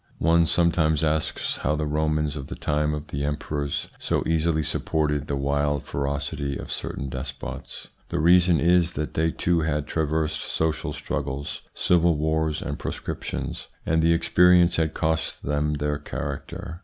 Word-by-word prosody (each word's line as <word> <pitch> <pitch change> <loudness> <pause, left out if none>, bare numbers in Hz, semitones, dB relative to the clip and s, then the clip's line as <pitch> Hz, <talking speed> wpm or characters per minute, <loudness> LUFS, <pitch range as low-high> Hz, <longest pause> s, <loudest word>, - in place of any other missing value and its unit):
One 85 0 +4
some 85 +1 +3
times 80 -2 +2
asks 80 -1 0
how 75 - 0
the 75 0 -1
Romans 75 0 0
of 70 -3 -6
the - - -6
time 75 0 0
of 75 +1 -7
the 70 -2 -3
emperors 75 -1 -2
so - - 0
easily 80 -1 +1
supported 75 0 0
the 70 - -1
wild 70 +1 0
ferocity 70 0 -2
of - - -7
certain 70 - -4
despots. 65 +1 -6 0.2
The - - -2
reason 85 +1 +5
is 85 0 +3
that 75 +1 -3
they 80 +1 +2
too 85 +1 +1
had 75 -2 0
traversed 80 -1 -1
social 80 -2 -1
struggles, 70 +2 -4
civil 85 -2 +3
wars, 80 0 0
and 70 -2 -4
proscriptions, - - -4 0.2
and 80 +1 +2
the 85 +1 +4
experience 85 +1 +5
had 80 -1 0
cost 80 0 -1
them 75 +1 0
their 75 0 -1
character. 85 +4 -5
75 Hz, 155 wpm, -25 LUFS, 75-80 Hz, 0.2 s, reason